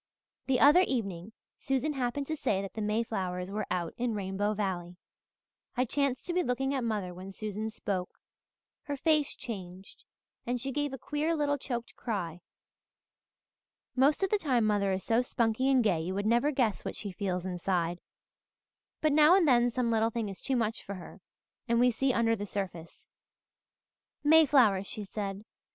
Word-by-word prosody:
"The 260 -2 +2
other 295 +7 +7
evening 205 - -2 0.3
Susan 270 +2 0
happened 265 +1 -2
to 315 - -2
say 205 -9 0
that 195 - -7
the 220 - -4
mayflowers 195 -4 -2
were 210 +1 -3
out 170 -2 -2
in 240 -2 -1
Rainbow 205 +1 -1
Valley. 180 -4 -3 0.8
I 250 - +3
chanced 275 0 -1
to 350 - -3
be 360 - +2
looking 270 0 -1
at 265 -3 -1
mother 210 -6 -2
when 185 +2 -9
Susan 215 +2 -4
spoke. 195 -4 -4 0.7
Her 285 -1 -3
face 305 0 +2
changed 190 -4 -8 0.4
and 245 +1 -2
she 270 +3 -3
gave 290 +1 -1
a 270 - -5
queer 305 +4 -1
little 290 -2 0
choked 240 -3 -5
cry. 180 -7 -4 1.5
Most 280 +7 +3
of 385 - +1
the 420 - +3
time 255 - +2
mother 205 -2 +2
is 190 0 -2
so 230 +1 +2
spunky 245 +1 0
and 260 -3 +4
gay 180 -7 +2
you 180 +3 -3
would 200 +1 -2
never 235 +6 +3
guess 250 -8 0
what - - -4
she 205 - -4
feels 180 -1 -3
inside; 175 -1 -1 1.0
but 310 - +3
now 305 +4 +7
and 370 -5 +4
then 245 -2 +5
some 245 0 -1
little 225 0 +2
thing 225 -2 -3
is 195 - -9
too 270 - -1
much 225 -2 -1
for 200 - -7
her 185 - -11 0.5
and 235 0 +2
we 250 0 +5
see 265 +3 +1
under 230 -2 +2
the 205 -1 -5
surface. 180 -5 -6 1.2
'Mayflowers!' 275 -11 +5
she 215 - -4
said. 200 0 -5
225 Hz, 175 wpm, -30 LUFS, 195-270 Hz, 1.5 s, other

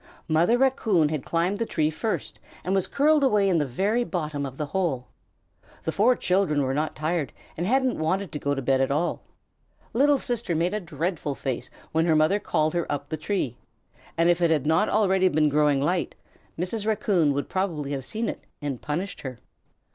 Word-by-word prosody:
Mother 170 +9 +3
Raccoon 220 - +2
had 150 -4 -3
climbed 175 +4 0
the 230 - 0
tree 155 -1 +1
first 220 +7 -3 0.2
and 185 - -1
was 195 -2 +1
curled 300 +1 +3
away 210 -7 +3
in 180 -4 +3
the 145 - 0
very 205 - +1
bottom 150 -9 -3
of 135 0 -10
the 150 - -2
hole. 145 -6 -2 0.7
The 160 - -1
four 230 +8 +4
children 180 -8 +1
were 130 0 -1
not 150 +3 -1
tired 155 -3 -1 0.2
and 175 +3 -2
hadn't 260 -1 +2
wanted 185 +3 -1
to 150 - -4
go 145 0 0
to 135 - -4
bed 135 +1 +2
at 135 - +1
all. 155 +5 0 0.7
Little 285 +4 +4
Sister 240 -8 -2
had - - 0
made 175 +4 +1
a 210 - 0
dreadful 160 -3 -3
face 130 -3 -4 0.2
when 160 +2 +2
her 160 - +4
mother 155 +7 +3
called 155 -5 0
her 170 -1 -1
up 145 0 -3
the 155 - -2
tree, 155 - -2 0.6
and 165 +1 +3
if 175 0 +3
it 170 - +4
had 150 -4 +1
not 160 +7 +3
already 190 -3 +3
been 155 -3 +3
growing 145 -1 +3
light, 170 +5 0 0.4
Mrs. 200 +5 -2
Raccoon 200 -8 +2
would 140 +1 -2
probably 165 -7 -2
have 135 -2 -3
seen 220 - -3
it - - -5 0.2
and 140 -5 -4
punished 175 +7 -4
her. 130 -3 -6
165 Hz, 200 wpm, -25 LUFS, 150-200 Hz, 0.7 s, four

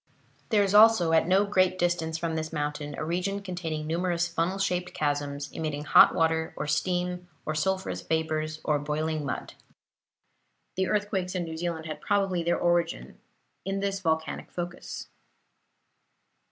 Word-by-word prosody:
There 210 -3 +4
is 200 0 0
also, 210 -6 +7
at 160 0 +4
no 190 +3 +4
great 185 -2 +2
distance 175 -2 0
from 165 -1 -2
this 160 0 -3
mountain, 145 -1 -3
a - - -3
region 185 +4 -2
containing 165 -5 -4
numerous 170 +1 0
funnel 175 +2 -1
shaped 180 -2 -1
chasms, 145 -1 -2
emitting 150 -2 -3
hot - - +7
water, 160 0 +1
or - - -2
steam, 180 +3 -1 0.2
or 155 - -1
sulphurous 155 - -1
vapors, 155 +2 -1
or 150 -1 +1
boiling 155 +1 -2
mud. 140 - -4 1.2
The 190 0 0
earthquakes 195 -2 -1
in 180 - 0
New 160 -1 -6
Zealand 165 -1 -3
had 155 -1 -6
probably 195 -4 +1
their 170 +1 +1
origin 175 -1 0 0.4
in 195 0 -2
this 195 0 -1
volcanic 160 -3 -1
focus. 175 0 -6
170 Hz, 150 wpm, -28 LUFS, 155-185 Hz, 1.2 s, also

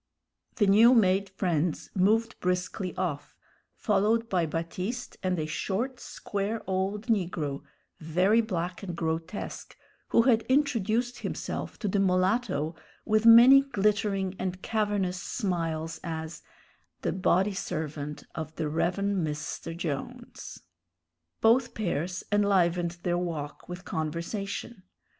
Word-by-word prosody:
The 210 - +3
new 220 +6 +7
made 195 -2 +3
friends 175 -4 -1
moved 220 +4 +2
briskly 180 0 -2
off, 165 -6 -3 0.4
followed 220 +2 +1
by 175 -4 +1
Baptiste 180 +10 -4
and 185 -1 0
a 155 - -1
short 210 - -2
square 205 +2 -4
old 195 +3 -2
negro, 175 - -1 0.4
very 180 +8 +3
black 180 -5 -3
and 180 -4 -5
grotesque, 165 +3 -4 0.3
who 230 - +4
had 230 -3 +4
introduced 245 -4 +1
himself - - -4
to 210 - -3
the 200 +1 +1
mulatto 185 -2 +1 0.3
with 215 +1 +3
many 245 +4 +9
glittering 205 -6 0
and 185 0 -4
cavernous 205 -5 -1
smiles 165 -7 -2
as 160 -1 -5 0.6
"d'body 190 +2 +2
servant 150 -5 -4
of 160 0 -6
d'Rev'n' 175 +5 0
Mr. 150 +2 -4
Jones." 155 -6 -6 0.8
Both 235 +2 +3
pairs 180 -3 -2
enlivened 180 -4 +2
their 175 0 +1
walk 160 -4 -5
with 180 +1 -7
conversation. 185 +7 -4
185 Hz, 110 wpm, -28 LUFS, 170-215 Hz, 0.8 s, many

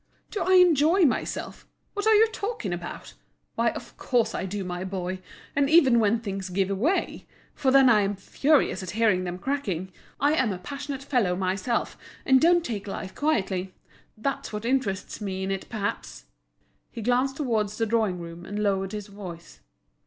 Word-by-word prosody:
Do 410 - -3
I 370 +2 +2
enjoy 350 0 +5
myself? 270 - -2 0.3
What 410 +1 -2
are 440 - +6
you 435 +2 +7
talking 405 - -3
about? 175 0 -7 0.4
Why, - - +2
of - - -8
course 235 -3 +1
I - - -3
do, 200 +1 -4
my 180 0 -4
boy, 185 -1 -4 0.4
and 280 0 +2
even 275 -7 +6
when 220 +1 +2
things 195 -4 -5
give 190 +1 0
way, 305 - -1 0.3
for 275 -3 0
then 270 0 +6
I 220 -4 +6
am 200 0 0
furious 270 +2 +1
at 185 - -6
hearing 210 -5 +3
them 175 0 -4
cracking, 190 - -3 0.3
I 290 +2 +3
am 260 -8 +2
a 185 - -3
passionate 280 +6 -6
fellow 240 -10 +1
myself, 190 +5 -1 0.3
and 265 -1 +5
don't 345 0 +4
take 210 -3 -4
life 190 -1 -5
quietly; 190 -11 -1 0.4
that's 270 +5 -3
what 210 +1 -5
interests 230 -7 -1
me 190 -2 -3
in 190 - -2
it 195 -1 -4
perhaps." 200 - -4 0.6
He 230 - -7
glanced 250 +3 +1
towards 215 -7 -1
the 225 - +1
drawing 215 -5 +1
room, 170 0 -8
and 205 +3 -6
lowered 195 -1 0
his 210 -1 -4
voice. 185 -5 -10
215 Hz, 175 wpm, -26 LUFS, 190-275 Hz, 0.6 s, you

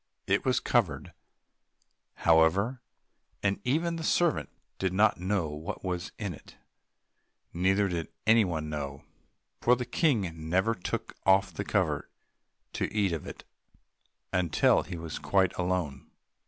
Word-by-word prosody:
It - - +2
was - - +2
covered, - - 0 1.1
however, 90 +10 +4 0.6
and 100 0 +1
even 165 +6 0
the 165 - -5
servant 170 0 +2 0.3
did 95 -1 0
not 105 -1 +3
know 90 -3 0
what 75 +2 -6
was 90 -2 -3
in 100 -5 -3
it, - - -15 1.0
neither 95 +3 +2
did 85 -3 -3 0.2
anyone 95 -9 +3
know, 70 -2 -5 0.6
for 125 - +5
the 125 0 -4
King 100 - 0
never 95 +6 +2
took 90 - -4
off 95 -1 +4
the - - -3
cover - - 0 0.6
to - - -2
eat 100 -3 +1
of 80 -3 -4
it - - -9 0.9
until 90 -4 +3
he 90 - -7
was 80 -1 -6
quite 95 -2 +2
alone. 90 -7 -2
95 Hz, 130 wpm, -29 LUFS, 80-105 Hz, 1.1 s, for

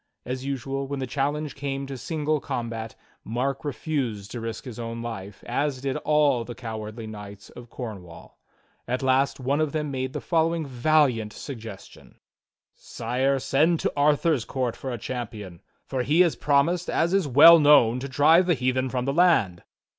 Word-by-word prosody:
As 130 +1 -4
usual, 135 0 -3
when 140 +1 -4
the 130 - -2
challenge 145 +3 -2
came 135 0 -4
to 135 0 -6
single 155 +2 -1
combat, 115 -3 -5 0.3
Mark 130 +4 -2
refused 130 -9 -3
to 120 - -5
risk 115 +3 -6
his 120 -3 -8
own 115 0 -5
life, 105 -4 -7
as 145 -2 -1
did 135 0 -2
all 150 -5 +2
the 120 0 -8
cowardly 110 -1 -6
knights 100 -2 -10
of 120 -1 -12
Corn 110 -7 -7
wall. 85 -1 -15 0.5
At 125 +2 -2
last 130 +1 +2
one 140 +4 0
of 155 -2 -1
them 150 -2 -2
made 130 -1 -3
the - - -3
following 165 -1 0
valiant 125 -4 +1
suggestion; 115 -7 -10 0.6
"Sire, 125 +4 -1
send 155 +5 +2
to - - -1
Arthur's 145 -1 +2
court 125 -1 -2
for 135 - -6
a 120 - -3
champion; 105 -7 -6 0.2
for 130 - -2
he 150 +7 +3
has 175 -3 +3
prom 140 -1 +3
ised, 175 +1 -2
as 170 +2 +1
is 195 -5 +2
well 160 +6 +9
known, 135 -5 +5
to 140 +2 -6
drive 160 +7 +4
the 175 - +3
heathen 130 0 0
from 125 -1 -2
the 135 - 0
land." 140 - +3
130 Hz, 175 wpm, -25 LUFS, 115-150 Hz, 0.6 s, well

